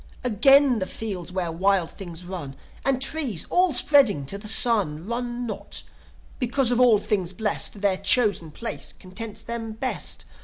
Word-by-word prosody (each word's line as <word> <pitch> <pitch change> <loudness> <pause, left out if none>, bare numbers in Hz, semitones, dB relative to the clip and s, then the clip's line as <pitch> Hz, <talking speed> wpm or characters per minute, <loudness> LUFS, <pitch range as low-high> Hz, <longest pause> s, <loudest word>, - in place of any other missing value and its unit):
"Again 260 +2 +5
the 185 - -2
fields 190 -6 -5
where 180 -2 -2
wild 185 0 +1
things 175 -3 -9
run! 170 -7 -7 0.3
And 270 -2 +1
trees, 270 - -1
all 360 0 +3
spreading 245 - +4
to 200 +9 -4
the 210 - -7
sun, 205 -8 +2
Run 240 +2 -3
not, 220 - -5 0.6
because, 250 0 +1
of 245 - +1
all 245 -4 +6
things 195 -3 -2
blest, 210 0 -1
Their 200 -2 +2
chosen 200 -4 +2
place 230 +10 -5
contents 205 +3 -8
them 225 -1 -4
best. 255 +4 -3
215 Hz, 155 wpm, -24 LUFS, 185-245 Hz, 0.6 s, all